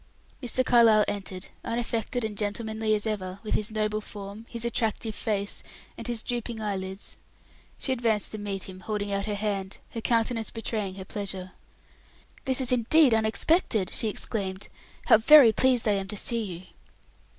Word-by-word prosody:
Mr. 255 0 +1
Carlyle 225 -3 +6
entered, 190 -2 -4
unaffected 235 +1 -2
and 215 -1 -4
gentlemanly 220 +1 -1
as 210 - -1
ever, 195 -3 -3
with 215 - -2
his 215 +1 +1
noble 215 -1 -1
form, 205 +2 -9
his 235 0 -3
attractive 225 -1 -1
face, 205 -2 -2 0.3
and - - -7
his 235 -2 -1
drooping 240 -2 -3
eyelids. 195 -2 -4 0.6
She 265 - -1
advanced 230 -4 +1
to 215 - -5
meet 200 -2 -3
him, 185 -1 -9
holding 205 +1 -3
out 200 +1 -1
her 210 - -1
hand, 200 -2 -2
her 230 - -5
countenance 230 -1 +1
betraying 215 -4 -3
her 190 -1 -8
pleasure. 195 -3 -6 0.9
"This 260 -1 +2
is 255 0 +3
indeed 250 +3 +5
unexpected," 220 - +2
she 225 - +1
exclaimed. 195 -2 -3 0.4
"How - - +7
very 265 0 +8
pleased 255 -2 +3
I - - +4
am 195 -1 -1
to 210 +1 -5
see 235 +3 0
you." 180 -1 -7
215 Hz, 160 wpm, -27 LUFS, 200-230 Hz, 0.9 s, very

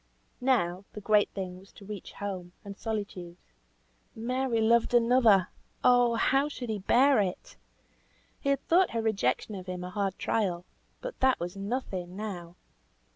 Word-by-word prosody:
Now, 195 -8 +1
the - - -6
great 210 0 +3
thing 185 -2 -6
was 195 +1 -18
to 200 - -14
reach 205 -2 -8
home, 185 -3 -6
and 200 0 -7
solitude. 200 -6 -5 0.8
Mary 250 +1 -1
loved 230 +2 +3
another! 230 -5 +5 0.3
Oh! 245 -1 +5
how 270 +5 +2
should 250 -5 -6
he 210 - -2
bear 260 +6 +4
it? 190 -3 -3 0.8
He 280 - -2
had 275 -1 0
thought 360 +2 +4
her - - +1
rejection 210 - 0
of 190 -2 -7
him 180 0 -5
a 180 - -6
hard 195 -1 -2
trial, 180 -5 -1 0.4
but - - -7
that 260 0 +3
was 175 +2 -4
nothing 195 -4 -4
now. 180 -5 -6
210 Hz, 155 wpm, -29 LUFS, 185-245 Hz, 0.8 s, another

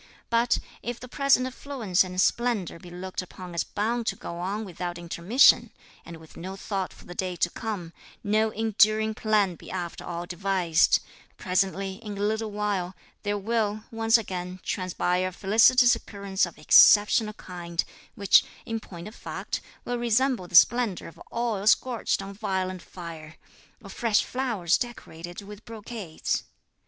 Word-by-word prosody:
But, 235 +1 +3 0.2
if 240 0 -5
the 250 - -9
present 270 0 +3
affluence 255 -8 0
and 185 0 -5
splendour 215 -5 +1
be 175 - -12
looked 180 +2 -5
upon 180 -1 -10
as 170 - 0
bound 230 +3 -2
to - - 0
go 170 - -7
on 200 +5 -3
without 175 -1 -5
intermission, 175 +8 +4 0.3
and 170 -1 -10
with 160 -1 -16
no 190 +3 -7
thought 195 -1 -3
for - - -16
the 175 - -9
day 180 0 -3
to 175 0 0
come, 195 -7 -5 0.3
no 215 +1 +2
enduring 220 0 +2
plan 210 -4 +1
be - - -13
after 175 -2 -5
all 175 0 -5
devised, 175 -2 +2 0.4
presently, 190 +1 -1
in 210 -3 -6
a - - -4
little 220 +1 0
while, 205 -3 -2 0.3
there 205 0 -1
will, 215 0 -1
once 225 0 +4
again, 185 -4 -5
transpire 185 0 -1
a - - -4
felicitous 225 +6 +5
occurrence 200 -2 -2
of 170 - -13
exceptional 210 +7 +6
kind, 175 -4 -4 0.3
which, 200 -1 +5 0.2
in 225 0 -3
point 175 -4 -10
of 215 - -10
fact, - - -5 0.2
will 245 0 -2
resemble 240 -3 +1
the 175 - -6
splendour 235 0 +5
of - - -17
oil 230 -4 -2
scorched 235 -4 +2
on 195 - -7
a - - -8
violent 190 -3 -2
fire, 165 -3 -10 0.5
or 200 - -10
fresh 225 -1 +2
flowers 230 -10 0
decorated 175 -7 -7
with 205 +1 -11
brocades. 220 -6 -4
200 Hz, 160 wpm, -26 LUFS, 180-225 Hz, 0.5 s, exceptional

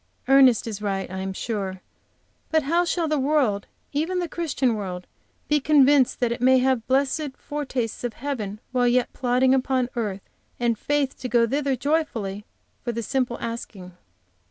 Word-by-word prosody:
Ernest 265 -4 +6
is 210 -3 -5
right, 195 -3 -2
I 190 - -4
am 190 0 -3
sure, 190 -2 -4 0.7
but 315 -1 +2
how 340 +5 +2
shall 340 -1 0
the 305 -1 +1
world, 265 -8 +1 0.3
even 325 +6 0
the 355 -1 -1
Christian 295 -7 0
world, 185 -4 -5 0.4
be 295 0 +3
convinced 280 -2 +4
that 240 -1 +2
it 235 +1 -3
may 260 +1 +6
have 255 -3 +1
blessed 275 +2 0
fortastes 260 -7 -4
of 240 -2 -2
heaven 225 -7 -4
while 250 -1 +2
yet 245 0 +2
plodding 255 +1 +2
upon 260 -1 +1
earth, 205 -5 -3 0.3
and 240 -1 +1
faith 285 +3 -1
to 255 - -4
go 235 -1 +4
thither 275 +2 0
joyfully, 245 -8 -1 0.4
for 240 - -1
the 230 0 -4
simple 250 -1 -1
asking? 200 -6 -6
255 Hz, 165 wpm, -24 LUFS, 225-280 Hz, 0.7 s, Ernest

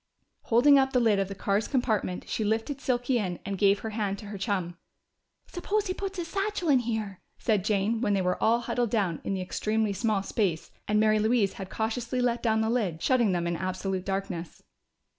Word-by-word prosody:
Holding 275 +5 +6
open 265 0 +1
the 250 - +4
lid 220 -4 +3
of 195 - 0
the 195 - -7
car's 200 +2 0
compartment 220 -9 -1
she 220 - -2
lifted 225 +6 -1
Silky 245 -1 +1
in 180 -4 -2
and 200 - -2
gave 200 +1 +3
her 220 - -4
hand 205 -2 -2
to 210 - -10
her 205 - -6
chum. 185 -4 -2 0.7
"Suppose 405 +4 -2
he 370 - -1
puts 390 0 -5
his 345 -2 -3
satchel 390 -2 -2
in 270 -3 +5
here," 220 -5 -3 0.2
said 215 -5 +1
Jane, 215 +2 0
when 205 -5 +2
they 195 - +1
were 180 0 -1
all 235 +2 +3
huddled 240 0 -1
down 195 -8 0
in 195 - -2
the 190 - -3
extremely 215 +3 -1
small 210 -1 0
space 190 -6 -1 0.2
and 210 0 +2
Mary 215 0 +4
Louise 220 -2 +2
had 190 -1 -7
cautiously 235 +3 -2
let 240 -1 +1
down 220 -2 +2
the 220 - 0
lid, 200 -10 -1
shutting 240 0 +2
them 175 -1 0
in 170 0 -1
absolute 185 +1 -3
darkness. 190 -3 -4
215 Hz, 210 wpm, -28 LUFS, 195-245 Hz, 0.7 s, Holding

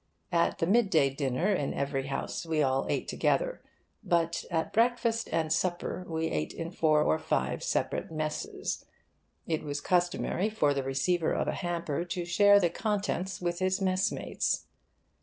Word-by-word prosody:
At 170 -1 +2
the - - +1
mid 210 +3 +3
day 140 -6 +4
dinner, 140 +8 0
in 145 -7 -1
every 140 -1 -2
house, 135 0 -3
we 160 -2 +1
all 135 0 +1
ate - - -1
together; - - 0 0.4
but 170 -3 +1
at 160 0 -1
breakfast 230 0 +2
and 160 -1 +1
supper 180 0 -1
we 160 -1 -2
ate 75 0 -2
in 165 0 -5
four 155 -4 +3
or 80 - +2
five - - -1
separate - - -1
'messes.' 155 -1 -3 0.6
It 160 -2 -1
was 145 -1 -3
customary 180 +4 +1
for 150 -10 +2
the 140 - -1
receiver 155 +6 0
of - - -1
a - - 0
hamper 170 -3 -2
to 175 0 -4
share 205 +4 +6
the 175 -4 +2
contents 195 -2 -2
with 175 -1 -1
his 185 +1 +1
mess 185 0 +1
mates. - - -1
170 Hz, 165 wpm, -29 LUFS, 150-185 Hz, 0.6 s, share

